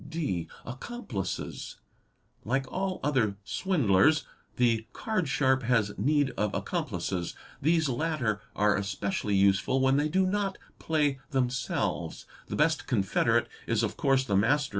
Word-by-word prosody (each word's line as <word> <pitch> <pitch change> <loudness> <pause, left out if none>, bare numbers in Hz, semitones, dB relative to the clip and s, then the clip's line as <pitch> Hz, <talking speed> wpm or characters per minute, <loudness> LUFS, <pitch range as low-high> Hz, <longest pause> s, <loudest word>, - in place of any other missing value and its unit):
(d) 145 - -2 0.2
Accomplices. 130 - -5 0.7
Like 135 +4 0
all 190 0 -2
other 120 -9 +1
swindlers 145 - +3 0.3
the 115 -2 +2
card 200 -9 -1
sharp 130 -1 +2
has 115 -4 +1
need 145 +5 +2
of 105 -1 -1
accomplices; 90 -3 -2 0.3
these 160 +1 +3
latter 130 -6 -1
are 105 0 +3
especially 100 +1 -1
useful 100 +6 +3
when 135 +1 +3
they 150 +1 +1
do 190 +4 +2
not 195 0 -1 0.2
play 150 -4 +1
themselves; 130 -2 -1 0.2
the - - -4
best 155 +1 +2
confederate 115 +1 +2 0.2
is 115 0 +1
of 110 - -1
course 135 -2 +2
the 100 - 0
master. 135 +8 +3
130 Hz, 130 wpm, -29 LUFS, 105-150 Hz, 0.7 s, swindlers